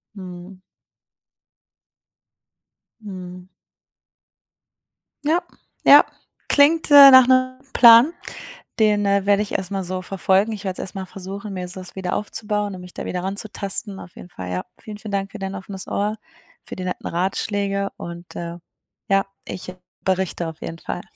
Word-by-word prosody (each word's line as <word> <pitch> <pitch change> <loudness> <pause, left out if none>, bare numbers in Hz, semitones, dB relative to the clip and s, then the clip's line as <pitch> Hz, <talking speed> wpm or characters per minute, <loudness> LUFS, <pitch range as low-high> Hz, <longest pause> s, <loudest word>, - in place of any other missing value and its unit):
Mhm. 185 0 -10 2.4
Mhm. 180 -3 -9 1.8
Ja, 320 +4 +2 0.4
ja. - - +8 0.4
Klingt, 310 +3 +4
äh, 280 -1 +11
nach 260 -1 +8
'nem 255 0 +2
Plan. 235 +6 +8 0.7
Den, 210 -1 +3
äh, 200 -1 +2
werde 205 0 +3
ich 210 - -5
erstmal 195 0 -2
so 185 +1 -4
verfolgen. 195 +3 +1
Ich 210 -2 -6
werde 190 -2 -2
es - - -9
erstmal 190 0 -6
versuchen, 195 +2 -8
mir 180 -1 -5
das 185 0 -9
wieder 185 -2 -3
aufzubauen 210 -1 -2
und 180 - -10
mich 180 0 -12
da - - -6
wieder 180 0 -3
ranzutasten, 200 0 -4
auf 175 - -12
jeden 175 - -12
Fall, 90 - -7
ja. 90 - -3
Vielen, 215 -1 -9
vielen 210 -1 -8
Dank 195 0 -2
für 215 - -9
dein 195 0 -5
offenes 190 0 -8
Ohr, 210 +2 -1 0.5
für - - -8
die 185 - -6
netten 180 0 -4
Ratschläge 200 +2 -1
und, 170 0 -9
äh, 170 0 -6 0.5
ja. 195 0 +3 0.2
Ich 185 0 -7 0.3
berichte 185 -2 -1
auf 160 -1 -9
jeden 165 - -7
Fall. 175 - -5
195 Hz, 150 wpm, -21 LUFS, 185-210 Hz, 2.4 s, äh